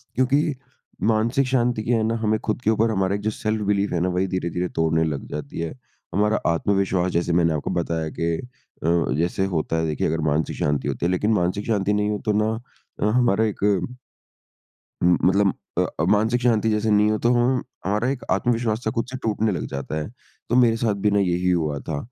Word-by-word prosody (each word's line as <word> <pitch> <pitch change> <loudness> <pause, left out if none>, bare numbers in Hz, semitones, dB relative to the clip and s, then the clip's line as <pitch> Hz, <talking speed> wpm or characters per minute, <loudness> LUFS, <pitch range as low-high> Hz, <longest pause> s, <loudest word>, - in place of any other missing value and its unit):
क्योंकि 140 +4 +2 0.6
मानसिक 115 +5 +1
शांति 120 -3 +1
की 115 - -1
है 115 -2 +2
ना, 115 +1 0
हमें 110 0 +2
खुद - - -3
के 110 - +1
ऊपर 110 +1 +2
हमारा 95 -1 +1
जो - - +4
सेल्फ-बिलीफ 105 -2 -1
है 85 - +1
ना, 90 +2 +1
वही 90 +2 0
धीरे-धीरे 90 -1 -2
तोड़ने 80 0 +2
लग 75 -4 -3
जाती 75 +1 -6
है। 85 - -3 0.4
हमारा 105 +3 +2
आत्मविश्वास 95 0 +1
जैसे 85 0 0
मैंने 85 -2 +3
आपको 75 - -3
बताया 80 -2 -2
कि 85 0 +1 0.5
अ, 80 - +1 0.3
जैसे 85 +3 0
होता 80 +1 -1
है, 80 - 0
देखिए 75 - -1
अगर 80 +1 -1
मानसिक 75 +2 0
शांति 75 -2 0
होती - - -2
है 90 - +2
लेकिन 105 +4 +1
मानसिक 90 +2 0
शांति 105 -2 +1
नहीं 105 0 +1
हो 105 - -1
तो 105 - +2
ना 110 - 0 0.5
अ, - - +2
हमारा 110 -1 +3
एक 105 -2 -4 1.4
म 90 0 +5
मतलब 100 +1 +3 0.2
अ, - - +3 0.2
मानसिक 110 +4 +2
शांति 115 -3 +2
जैसे 110 0 0
नहीं 105 +1 +4
हो 110 - +1
तो 120 - +2
हम 125 +1 +2 0.2
हमारा 105 +6 +1
एक 135 -2 -3
आत्मविश्वास 115 +2 0
था 110 - +1
खुद 115 - +1
से 130 - -4
टूटने 110 0 +1
लग 90 - -3
जाता 70 +3 -5
है। 75 - -5 0.4
तो 120 - +1
मेरे 115 -2 +4
साथ 110 -3 +1
भी 105 - +4
ना 100 - +3
यही 90 -1 +1
हुआ 75 -5 0
था। 80 +1 -4
105 Hz, 205 wpm, -23 LUFS, 85-110 Hz, 1.4 s, म